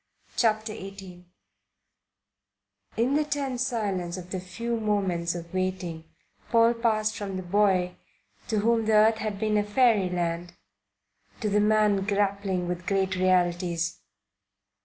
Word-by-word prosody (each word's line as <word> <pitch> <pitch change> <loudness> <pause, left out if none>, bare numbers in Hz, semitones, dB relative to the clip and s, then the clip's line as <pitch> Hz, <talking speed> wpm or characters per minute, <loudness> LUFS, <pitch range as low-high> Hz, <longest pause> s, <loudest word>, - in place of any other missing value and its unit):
CHAPTER 215 -1 +1
XVIII 195 -3 -10 1.7
IN 240 +4 +2
the 300 +1 +3
tense 280 -4 -2
silence 195 -8 -2
of 180 0 -9
the 185 - -2
few 230 +6 -4
moments 190 -6 0
of 170 0 -8
waiting 185 -3 -3 0.4
Paul 230 0 +5
passed 215 -2 0
from 195 -3 -4
the 185 - -5
boy 185 -1 +2 0.5
to 215 -3 0
whom 225 0 +2
the 220 - +2
earth 220 +1 +5
had 215 -2 -3
been 215 +1 +1
a - - +1
fairyland 180 -7 +1 0.9
to 215 - 0
the 205 +1 +3
man 210 -2 +3
grappling 200 -2 0
with 175 0 -4
great 195 -1 +1
realities. 175 -2 +1
200 Hz, 130 wpm, -27 LUFS, 180-215 Hz, 1.7 s, Paul